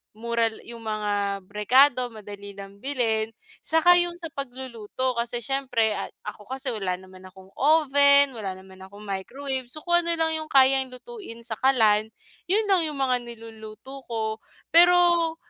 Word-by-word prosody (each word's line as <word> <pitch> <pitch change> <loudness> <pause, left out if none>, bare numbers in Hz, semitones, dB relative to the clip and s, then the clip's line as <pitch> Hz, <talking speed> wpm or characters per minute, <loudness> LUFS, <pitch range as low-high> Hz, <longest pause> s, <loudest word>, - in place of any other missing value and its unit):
mural 230 0 -2
yung 235 0 -10
mga 205 -3 -2
rekado, 250 +4 +4
madali 205 -3 -10
lang 200 0 -11
bilhin. 225 -4 -1 0.3
'Tsaka 350 +2 +5
yung 350 0 0
sa 335 -2 -9
pagluluto, 255 -2 -4
kasi 235 0 -3
siyempre 250 -4 0
ay - - -4 0.2
ako 210 0 -9
kasi 265 0 -3
wala 195 -5 -2
naman 185 0 -15
akong 190 0 -16
oven, 280 -2 +5
wala 200 -6 -5
naman 190 0 -15
akong 200 +2 -13
microwave. 260 +7 -4
So, 305 +5 -9
kung 345 -1 +3
ano 335 0 0
lang 325 -1 +1
yung 310 - -7
kayang 265 -1 +4
lutuin 255 - -11
sa 225 -2 -5
kalan, 220 -5 +3 0.4
'yon 415 +5 +2
lang 350 -4 +3
yung 300 - -5
mga 255 -2 +1
niluluto 225 +3 -11
ko. 220 -1 -3 0.3
Pero 345 -1 +5
245 Hz, 155 wpm, -25 LUFS, 215-280 Hz, 0.4 s, Tsaka